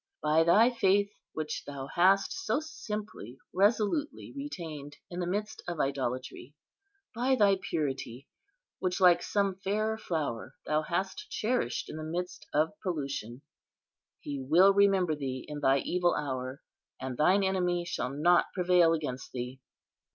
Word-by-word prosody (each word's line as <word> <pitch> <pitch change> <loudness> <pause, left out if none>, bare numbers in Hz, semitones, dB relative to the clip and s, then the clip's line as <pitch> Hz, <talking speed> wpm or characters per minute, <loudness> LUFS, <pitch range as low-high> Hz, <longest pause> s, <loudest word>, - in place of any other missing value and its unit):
By 155 +1 +4
thy 215 +9 +5
faith, 200 -3 +2 0.2
which 155 -2 -4
thou 140 -2 -5
hast 190 +7 +3
so 370 -5 -1
simply, 210 - -7 0.2
resolutely 210 - +1
retained 160 - -7
in 175 - -5
the 175 - -1
midst 210 +3 -3
of 175 -3 -4
idolatry; 130 0 -3 0.6
by 255 +3 +2
thy 200 -5 +4
purity, 135 -6 -3 0.5
which, 180 +1 -1
like 175 -2 +6
some 200 -2 0
fair 215 +3 0
flower, 155 - -3
thou 155 0 +1
hast 180 +4 -3
cherished 245 +3 -1
in - - -7
the 155 - -5
midst 175 0 -5
of 155 +2 +2
pollution, 140 - -4 0.8
He 140 -1 -5
will 175 +9 +5
remember 195 -4 +4
thee 135 -3 -4
in 150 -1 -5
thy 135 -1 +4
evil 175 +5 +1
hour, 130 -1 -4 0.4
and 130 -1 -4
thine 185 +8 +4
enemy 180 -2 0
shall 175 -7 -2
not 165 +6 +3
prevail 180 -2 +4
against 145 -5 -4
thee! 125 +1 -5
175 Hz, 140 wpm, -30 LUFS, 145-195 Hz, 0.8 s, like